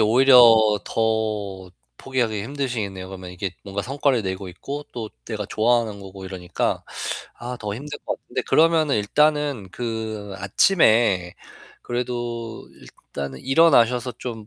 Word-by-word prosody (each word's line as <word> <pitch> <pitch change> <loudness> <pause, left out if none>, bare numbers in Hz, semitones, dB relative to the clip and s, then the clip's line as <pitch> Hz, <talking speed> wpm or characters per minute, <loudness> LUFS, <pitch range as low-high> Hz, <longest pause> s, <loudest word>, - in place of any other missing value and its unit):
오히려 125 +4 +6 0.5
더 105 -4 -1 0.3
포기하기 120 -6 -1
힘드시겠네요. 115 -8 -4
그러면 95 -1 -8
이게 90 +2 -4
뭔가 100 0 -4
성과를 135 -1 +1
내고 95 0 -4
있고 140 +12 -6
또 115 -3 -5 0.2
내가 110 -3 -4
좋아하는 110 -2 +1
거고 95 0 -10
이러니까 90 -2 -3 0.5
아 125 +1 -5
더 105 -1 -4
힘들 145 +4 -7
것 - - -3
같은데 - - -4
그러면은 160 -2 +3
일단은 145 0 +1
그 110 -3 -5
아침에 100 - +3 0.5
그래도 120 -2 -4
일단은 70 -2 -8
일어나셔서 125 -4 +4
좀 110 -4 -6
110 Hz, 300 characters per minute, -23 LUFS, 100-125 Hz, 0.5 s, 오히려